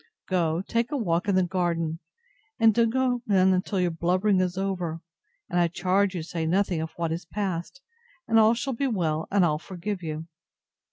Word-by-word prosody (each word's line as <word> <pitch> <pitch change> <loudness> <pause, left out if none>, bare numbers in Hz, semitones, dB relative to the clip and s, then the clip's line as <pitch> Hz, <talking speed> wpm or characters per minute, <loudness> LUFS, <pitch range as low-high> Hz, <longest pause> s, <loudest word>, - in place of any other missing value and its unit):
Go, 170 -2 0
take 230 +3 -1
a 290 - 0
walk 175 -6 0
in 200 - +2
the 185 - +4
garden, 170 -3 -1 0.6
and 225 -1 +6
don't 230 +1 +3
go 250 0 +1
in 190 -2 +4
till 195 0 -3
your 180 -1 +1
blubbering 185 +4 +1
is 185 0 -1
over: 180 -4 -2 0.5
and 175 - 0
I 175 - +4
charge 185 +3 +1
you 170 - -3
say 165 -1 -3
nothing 180 -1 +1
of 160 0 -5
what 165 -1 -2
is 170 +2 -4
past, 190 +7 -4 0.4
and 225 - +4
all 220 +1 +5
shall 265 +3 -2
be 275 +4 -1
well, 165 -9 -1
and 195 -3 +3
I'll 150 -2 +1
forgive 185 +3 -5
you. 160 -1 -5
185 Hz, 190 wpm, -26 LUFS, 170-205 Hz, 0.6 s, and